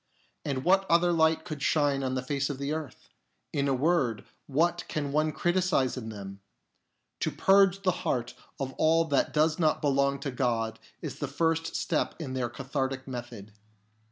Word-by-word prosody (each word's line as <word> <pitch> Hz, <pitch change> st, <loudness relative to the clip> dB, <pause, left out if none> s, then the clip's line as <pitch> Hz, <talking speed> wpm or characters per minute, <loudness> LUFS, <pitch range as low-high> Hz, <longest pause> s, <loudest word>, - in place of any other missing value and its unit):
And 135 Hz, -2 st, -2 dB
what 190 Hz, +2 st, +3 dB
other 170 Hz, +1 st, +4 dB
light 160 Hz, -1 st, +3 dB
could 150 Hz, -3 st, -6 dB
shine 145 Hz, -3 st, +2 dB
on 130 Hz, -1 st, -1 dB
the 130 Hz, -, -2 dB
face 140 Hz, +1 st, -1 dB
of 140 Hz, -, -3 dB
the 140 Hz, +2 st, -2 dB
earth 155 Hz, -4 st, -6 dB, 0.5 s
1 -, -, -1 dB
In 140 Hz, -, +1 dB
a 135 Hz, -, +2 dB
word, 135 Hz, -5 st, +1 dB, 0.2 s
what 170 Hz, +5 st, +1 dB
can 145 Hz, -2 st, -3 dB
one 155 Hz, +1 st, +2 dB
criticise 175 Hz, -7 st, +1 dB
in 115 Hz, -4 st, -6 dB
them? 100 Hz, -2 st, -8 dB, 0.8 s
To -, -, 0 dB
purge 195 Hz, 0 st, +4 dB
the 185 Hz, -, +3 dB
heart 125 Hz, -9 st, -1 dB, 0.3 s
of 135 Hz, -1 st, -3 dB
all 165 Hz, +1 st, +4 dB
that 145 Hz, -4 st, +1 dB
does 155 Hz, +2 st, +2 dB
not 155 Hz, -2 st, +2 dB
belong 140 Hz, -1 st, +2 dB
to 140 Hz, -, -3 dB
God 115 Hz, -3 st, -1 dB, 0.2 s
is -, -, -5 dB
the 145 Hz, -, -2 dB
first 165 Hz, +3 st, 0 dB
step 160 Hz, -, -1 dB
in 145 Hz, -6 st, -5 dB
their 125 Hz, -2 st, -1 dB
cathartic 135 Hz, +1 st, -3 dB
method. 120 Hz, -5 st, -7 dB
140 Hz, 180 wpm, -28 LUFS, 130-160 Hz, 0.8 s, other